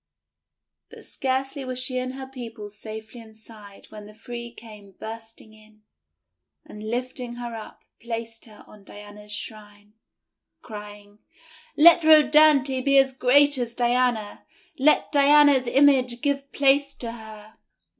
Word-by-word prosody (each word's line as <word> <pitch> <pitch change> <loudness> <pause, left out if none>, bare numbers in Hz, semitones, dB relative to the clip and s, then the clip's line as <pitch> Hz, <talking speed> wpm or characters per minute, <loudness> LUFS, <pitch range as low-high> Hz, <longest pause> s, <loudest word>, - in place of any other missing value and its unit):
But - - -14
scarcely 270 +1 -3
were 255 -1 -5
she 255 0 -2
and 255 +1 -5
her 265 0 -7
people 230 -5 -10
safely 220 +2 -10
inside 220 -2 -15
when 210 -1 -11
the 210 - -16
three 235 +1 -8
came 210 -4 -14
bursting 225 +1 -11
in, 215 0 -22 0.8
and, 210 - -12
lifting 245 0 -5
her 240 -1 -7
up, 220 -1 -11 0.2
placed 230 0 -6
her 215 -2 -16
on 210 -1 -18
Diana's 205 +1 -13
shrine, 205 0 -9 0.7
crying: 205 -1 -11 0.3
— - - -25
:<Let 340 +3 +7
Rhodanthe 300 -4 +4
be 275 0 +3
as 270 -1 +3
great 280 +2 +3
as 235 -1 -4
Diana! 240 -3 -1 0.4
Let 300 +3 +2
Diana's 285 -2 +4
image 260 -3 +2
give 280 -1 -2
place 280 0 +2
to 235 -2 -6
her!' 220 -2 -13
240 Hz, 135 wpm, -23 LUFS, 215-270 Hz, 0.8 s, <Let